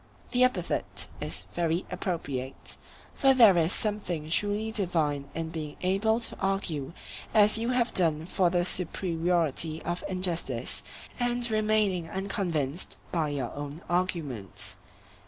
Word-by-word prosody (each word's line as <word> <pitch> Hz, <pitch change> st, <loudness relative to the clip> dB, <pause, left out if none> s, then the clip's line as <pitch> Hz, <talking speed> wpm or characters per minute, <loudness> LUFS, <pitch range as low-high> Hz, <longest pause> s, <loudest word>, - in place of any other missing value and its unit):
The 250 Hz, -1 st, +4 dB
epithet 255 Hz, 0 st, 0 dB
is -, -, -3 dB
very 170 Hz, +1 st, 0 dB
appropriate, 140 Hz, -8 st, -3 dB, 0.4 s
for 270 Hz, -1 st, +4 dB
there 225 Hz, -7 st, +8 dB
is 165 Hz, 0 st, +3 dB
something 180 Hz, -9 st, -2 dB
truly 210 Hz, +4 st, +1 dB
divine 155 Hz, -9 st, 0 dB
in 165 Hz, 0 st, -2 dB
being 155 Hz, -2 st, -5 dB
able 205 Hz, +5 st, +2 dB
to -, -, -1 dB
argue 175 Hz, -7 st, -1 dB, 0.4 s
as 215 Hz, +1 st, +6 dB
you 230 Hz, +2 st, -1 dB
have 245 Hz, -1 st, +1 dB
done 160 Hz, -3 st, +2 dB
for 180 Hz, 0 st, +2 dB
the 175 Hz, 0 st, +1 dB
superiority 165 Hz, -3 st, 0 dB
of 175 Hz, +1 st, -3 dB
injustice, 170 Hz, -10 st, -1 dB, 0.4 s
and 245 Hz, 0 st, +1 dB
remaining 210 Hz, -5 st, +2 dB
unconvinced 175 Hz, -5 st, -1 dB
by 160 Hz, -3 st, +1 dB
your 135 Hz, -5 st, -3 dB
own 145 Hz, +2 st, -6 dB
arguments. 125 Hz, -, -1 dB
175 Hz, 125 wpm, -28 LUFS, 155-205 Hz, 0.4 s, there